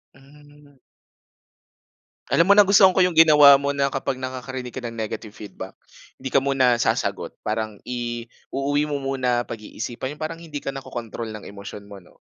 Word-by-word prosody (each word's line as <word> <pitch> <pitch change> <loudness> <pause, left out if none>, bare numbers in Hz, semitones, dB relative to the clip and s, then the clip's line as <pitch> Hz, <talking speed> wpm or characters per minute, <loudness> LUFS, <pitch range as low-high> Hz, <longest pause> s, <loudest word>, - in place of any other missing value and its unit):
Hmm. 145 +1 -20 1.6
Alam 170 +3 +4
mo 200 - +9
nagustuhan 200 -1 +7
ko 185 0 +3
yung 180 - 0
ginawa 150 -3 +8
mo 140 - -1
na 140 -1 +1
kapag 135 -1 -2
nakakarinig 130 -1 -6
ka 130 - -6
ng 115 -1 -7
negative 110 0 -5
feedback, 105 -2 -10 0.4
'di 130 0 -7
ka 135 - +5
muna 135 -2 +3
sasagot, - - -1
parang 110 -1 -3
i-uuwi 125 +4 -3
mo 145 - -1
muna 130 -3 -1
pag-iisipan 120 +5 -6
yung - - -18
parang 165 +1 -5
hindi 155 -3 -7
ka 135 -1 -5
nakokontrol 120 -4 -6
ng 105 -1 -9
emosyon 100 0 -10
mo 100 -1 -12
'no? 90 - -23
130 Hz, 160 wpm, -23 LUFS, 115-145 Hz, 1.6 s, mo